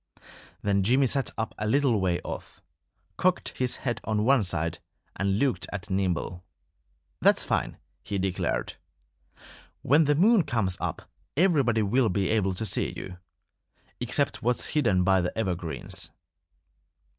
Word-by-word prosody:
Then 100 -1 +2
Jimmy 130 +8 +3
sat 135 +1 0
up 110 -1 -2
a 105 - -1
little 125 -3 +2
way 90 -2 +1
off, - - -7 0.6
cocked 185 0 +1
his 125 -1 +1
head 120 -3 -1
on 105 -1 0
one 135 -2 +4
side, 85 -3 -1 0.4
and 100 0 0
looked 130 0 0
at 100 -2 -6
Nimble. 90 -1 -1 0.8
"That's - - +4
fine!" - - -1 0.3
he 100 - -3
declared. 95 -10 -2 1.1
"When 150 +5 +4
the 145 +1 +3
moon 210 +6 +5
comes 110 - -1
up - - -3 0.3
everybody 140 - +3
will 115 +3 +2
be 95 +1 0
able 100 -4 +1
to 110 - -3
see 105 - -1
you 90 -1 -8 0.8
except - - -1
what's 125 +1 +1
hidden 115 -12 +2
by 95 0 +4
the 90 +3 -3
evergreens." 90 -6 -3
105 Hz, 140 wpm, -27 LUFS, 95-130 Hz, 1.1 s, moon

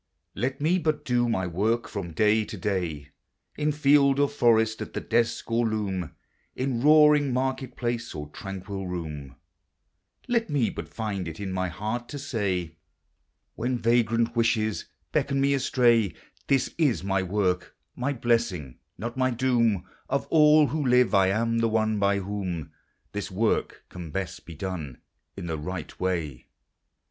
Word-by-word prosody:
Let 130 +2 -2
me 165 +5 +2
bul 155 -2 +2
do 120 -4 0
my 95 -5 0
work 105 +7 0
from 100 -5 -5
day 110 +3 +3
to 105 - -7
day, 85 -7 -2 0.5
In 150 0 0
field 140 -1 +4
or 145 - +4
forest, 110 -5 +2
at - - -6
the - - 0
desk 115 0 0
<>i - - -1
loom, 105 -7 -1 0.4
In 130 -3 -1
roaring 150 -1 +6
market 130 0 -2
place, 120 -3 -3
or 75 -1 -5
tranquil 95 +2 -6
room; 75 -6 -6 0.9
Let 235 -4 +1
me 140 -6 +1
bul - - -6
find 100 -5 -4
it 80 0 -7
in 100 -2 -4
my 95 0 -1
bear! 105 +8 -3
to 120 +4 -9
ij, 100 - -2 0.8
When 125 +2 -1
vagrant 115 0 +2
wishes 110 -2 +1 0.3
beckon 140 0 +1
me 140 +1 +3
• 120 - +3 0.2
— - - -35
"This 135 -2 +1
is 140 - +2
my 95 -1 +1
work; 90 -1 -1 0.2
mj 130 -1 -3
blessing, 115 - 0 0.2
not 120 +3 -5
my 130 0 +2
do» 115 -6 +2 0.3
Of 140 +1 0
all 150 -1 +6
who 150 +3 -1
live, 125 -2 +4
I 95 -1 +5
am 115 +4 +1
the 115 0 +2
our 110 0 +2
b> 100 -2 +1
whom 90 -6 -4 0.4
This 105 -1 -4
work 105 +4 0
can 85 -3 -8
besl 95 0 -4
be 85 - -9
done, 80 -7 -5 0.4
in - - -5
the 80 -2 -3
righl 85 0 -5
wa 85 -8 -1
." - - -48
110 Hz, 160 wpm, -26 LUFS, 95-130 Hz, 0.9 s, roaring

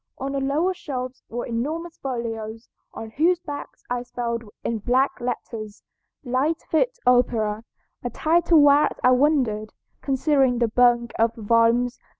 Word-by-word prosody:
On 270 +1 -4
the 275 - -1
lower 295 +7 +1
shelves 255 -7 -6
were 240 +1 -4
enormous 310 +9 -4
folios, 230 -3 -5 0.2
on 220 -1 -8
whose 335 +8 +2
backs 290 -5 -8
I 245 0 -2
spelled 235 -1 -4 0.2
in 230 -1 -2
black 255 +5 +2
letters, 225 -3 -5 0.4
'Lightfoot 315 - 0
Opera,' 225 -4 +2 0.4
a 245 - -2
title 330 +3 +3
whereat 290 +1 +4
I 255 - +6
wondered, 250 -6 +1 0.3
considering 270 -2 +2
the 235 -1 +1
bulk 240 0 +3
of 230 0 +2
the 225 - -10
volumes. 230 +3 +2
250 Hz, 140 wpm, -23 LUFS, 230-285 Hz, 0.4 s, I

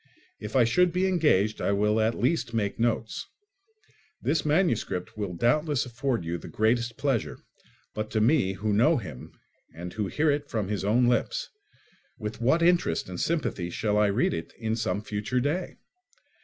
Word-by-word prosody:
If 105 +4 -7
I 130 - +6
should 175 +10 +3
be 180 +2 +1
engaged, 150 - +2
I 100 - +1
will 105 +2 +2
at 110 +1 +1
least 125 -3 0
make 100 -2 -1
notes. 115 -1 -1 0.9
This 160 - 0
manuscript 150 - 0
will 100 -4 -4
doubtless 145 - +1
afford 125 - -2
you 85 +1 -3
the - - -10
greatest 115 +2 0
pleasure; 135 -6 -1 0.6
but 110 0 -4
to 110 - 0
me, 110 -4 +3
who 105 +2 -1
know 135 +10 +4
him, 75 - -8 0.4
and 90 +2 -7
who 105 -2 -2
hear 150 +8 +2
it 145 0 -2
from 105 -4 -2
his 105 -2 -2
own 115 +5 +3
lips—with 410 - -4
what 160 +8 +3
interest 170 - +2
and 90 - -6
sympathy 140 - -1
shall 105 +4 -1
I 105 - +4
read 100 +5 +1
it 80 0 -5
in 110 -1 -1
some 105 -3 -2
future 105 +4 -2
day! 155 +8 -2
115 Hz, 170 wpm, -27 LUFS, 105-145 Hz, 0.9 s, I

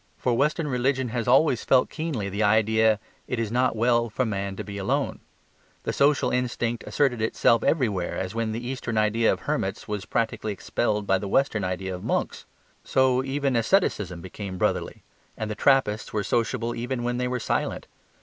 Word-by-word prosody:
For 125 - 0
Western 150 +4 +1
religion 130 -1 0
has 115 0 -3
always 130 -1 +4
felt 130 -1 +3
keenly 155 -11 -3
the 100 +2 -3
idea 110 +1 +3 0.3
"it 125 - -2
is 115 -2 -2
not 125 0 +2
well 120 +1 +2
for 125 +4 -1
man 100 -3 -3
to - - -5
be 100 -1 -7
alone." 95 - -1 0.6
The - - -2
social 145 +1 +3
instinct 120 -2 -1
asserted 130 -6 +1
itself 115 +1 +3
everywhere 105 - 0
as 95 +1 -3
when 115 -1 -1
the 120 +2 -4
Eastern 125 -3 -3
idea 110 +2 +3
of - - -3
hermits - - -2
was 105 -2 -4
practically 110 -2 -1
expelled 105 +1 -1
by 95 -1 +2
the 100 - -5
Western 110 -2 +1
idea 95 +1 -3
of 90 - -7
monks. - - -2 0.4
So 130 -1 +2
even 135 0 -1
asceticism 110 - +1
became 95 +1 -7
brotherly; - - -1 0.3
and 110 -1 -3
the - - -3
Trappists 115 -4 +2
were 105 -1 -1
sociable 115 +2 0
even 120 +1 -3
when 120 0 -1
they 125 0 0
were 125 0 -2
silent. - - -2
115 Hz, 180 wpm, -25 LUFS, 105-125 Hz, 0.6 s, always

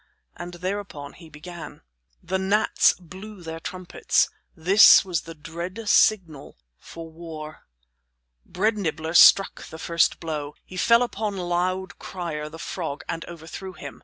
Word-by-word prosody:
And 175 0 -8
thereupon 180 -6 -5
he 165 -3 -15
began: 165 - -10 0.4
The 190 +2 -2
gnats 200 +3 +3
blew 185 +3 -12
their 165 0 -6
trumpets. 180 +1 0 0.3
This 190 +5 +7
was 180 -4 -1
the 165 0 -10
dread 170 +8 -7
signal 175 -10 +2 0.2
for 165 0 -10
war. 160 -2 -10 0.8
Bread 215 - -1
Nibbler 160 -3 -3
struck 195 +2 +6
the 160 - -10
first 170 0 +1
blow. 150 -3 -5
He 185 - -12
fell 235 +5 +4
upon 210 -4 -3
Loud 185 +2 -2
Crier 160 -5 -5
the 160 - -10
frog, 165 -3 -5
and 165 -1 -4
overthrew 170 +3 -9
him. 145 -4 -10
175 Hz, 135 wpm, -24 LUFS, 160-190 Hz, 0.8 s, This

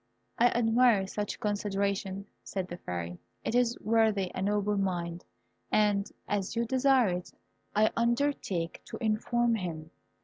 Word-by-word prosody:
"I 240 - +7
admire 235 -3 +4
such 205 +2 -4
consideration," 200 -1 -1 0.2
said 190 -2 -3
the 175 - -6
Fairy; 85 - -5 0.2
"it - - -2
is 245 -1 +2
worthy 215 -4 +2
a - - -4
noble 205 +1 +1
mind, 175 -3 -2 0.5
and 205 -1 +3 0.2
as 205 0 -1
you 235 +1 +1
desire 260 -2 +4
it, 180 0 -4 0.4
I 215 +1 +4
undertake 235 -8 0
to - - -7
inform 235 +1 +1
him." 165 -6 -4
205 Hz, 135 wpm, -30 LUFS, 190-230 Hz, 0.5 s, I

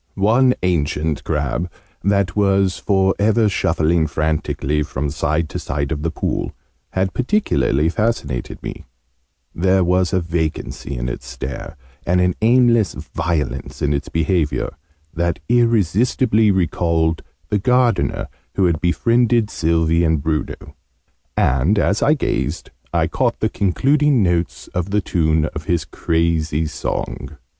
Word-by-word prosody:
One 120 +6 +3
ancient 80 -3 0
crab, 75 +3 -2 0.3
that 100 -2 +1
was 100 -2 +2
for 95 -1 +2
ever 110 +2 +3
shuffling 80 -4 +1
frantically 75 -1 -1
from 75 -1 -3
side 80 +2 0
to - - -4
side 70 0 -3
of 75 -2 -2
the 85 - -1
pool, 80 - -3 0.4
had 95 0 0
particularly 80 - +1
fascinated 105 - -2
me: - - -7 0.7
there 95 +2 +2
was 90 0 +2
a 95 - +2
vacancy 75 -6 -3
in - - -3
its - - -5
stare, 65 +6 -6 0.3
and 90 +1 +1
an 90 0 +2
aimless 120 -2 +4
violence 80 -3 -3
in 75 0 +2
its 70 - -3
behaviour, 80 -5 0 0.4
that 85 0 -1
irresistibly 115 0 +3
recalled 85 -3 +1 0.3
the 105 - +1
Gardener 125 -2 +1 0.3
who 95 - +3
had 85 -4 +1
befriended 115 +4 +2
Sylvie 80 0 +1
and 80 -2 +2
Bruno: 80 -1 -3 0.6
and, 70 +11 +2
as 100 0 +1
I 150 - +4
gazed, 145 - -2 0.2
I - - +2
caught - - -1
the - - +1
concluding 135 - +2
notes 85 -1 -1
of 90 +1 -3
the 105 +1 +1
tune 80 -4 +1
of - - -6
his 85 -2 0
crazy 80 -1 0
song. 75 0 -4
85 Hz, 135 wpm, -19 LUFS, 80-105 Hz, 0.7 s, aimless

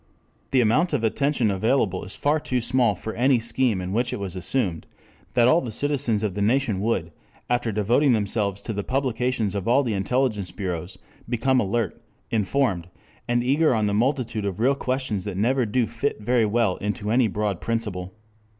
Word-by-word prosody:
The 130 - +3
amount 150 +10 +2
of 130 -6 0
attention 125 -1 +1
available 100 -1 +1
is 95 - -7
far 150 +2 +1
too 130 -4 -1
small 120 -2 +2
for 110 +4 -6
any 130 +2 +3
scheme 115 -2 0
in 90 +1 -4
which 120 +3 0
it - - -4
was 95 -2 -4
assumed 95 -2 -1 0.5
that 120 -1 +5
all 160 +7 +5
the 125 - -5
citizens 125 -3 0
of 105 -3 -1
the 100 - -3
nation 115 -1 +1
would, 95 -6 -1 0.4
after 120 -2 +1
devoting 120 +7 +3
themselves 100 -2 -1
to 110 - -3
the 100 0 -3
publications 125 -4 -1
of 100 0 -3
all 125 +4 +4
the 120 -4 -1
intelligence 105 -1 0
bureaus, 90 -4 -5 0.3
become 130 +2 +2
alert, 110 -2 -1 0.3
informed, 105 -4 0 0.4
and 120 0 +1
eager 140 +2 +3
on 110 -1 +1
the 100 - 0
multitude 120 -1 0
of 100 -1 -3
real 130 +5 +3
questions 130 -7 -2
that 100 -3 -4
never 120 +4 +1
do 120 +3 +1
fit 115 +4 -3
very 115 +1 +2
well 105 -3 +1
into 105 +1 -3
any 120 0 +4
broad 105 -2 -2
principle. 105 -6 -3
115 Hz, 185 wpm, -24 LUFS, 100-130 Hz, 0.5 s, that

